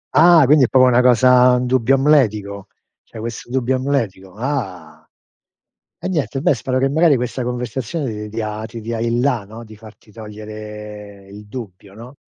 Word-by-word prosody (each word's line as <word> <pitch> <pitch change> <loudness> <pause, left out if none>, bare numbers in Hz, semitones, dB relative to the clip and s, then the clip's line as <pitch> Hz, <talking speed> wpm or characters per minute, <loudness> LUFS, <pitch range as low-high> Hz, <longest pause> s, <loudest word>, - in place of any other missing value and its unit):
Ah, 165 0 +7
quindi, 145 0 +5
è - - -1
proprio 130 -1 +4
una 125 0 +4
cosa 125 0 +5
un 125 - -1
dubbio 130 +1 +2
amletico. 110 -9 +1 0.4
C'hai 110 - -12
questo 115 +1 -7
dubbio 130 0 0
amletico. 115 -9 -3
Ah. 120 -8 -5 0.9
Eh, - - -7
niente, 150 -6 -2
beh 145 - +2
spero 130 +2 -2
che 135 +1 +1
magari 155 0 +3
questa 125 +1 -3
conversazione 125 +2 -4
ti 105 0 -7
dia 110 0 -5
ti 115 +1 -9
dia 115 +1 -5
il 115 +1 -1
la, 125 -6 0
no, 110 +4 -11
di 110 -1 -14
farti 110 -1 -17
togliere 105 -2 -10
il 105 +1 -12
dubbio, 100 -5 -10
no? 120 +5 -12
120 Hz, 170 wpm, -19 LUFS, 105-130 Hz, 0.9 s, Ah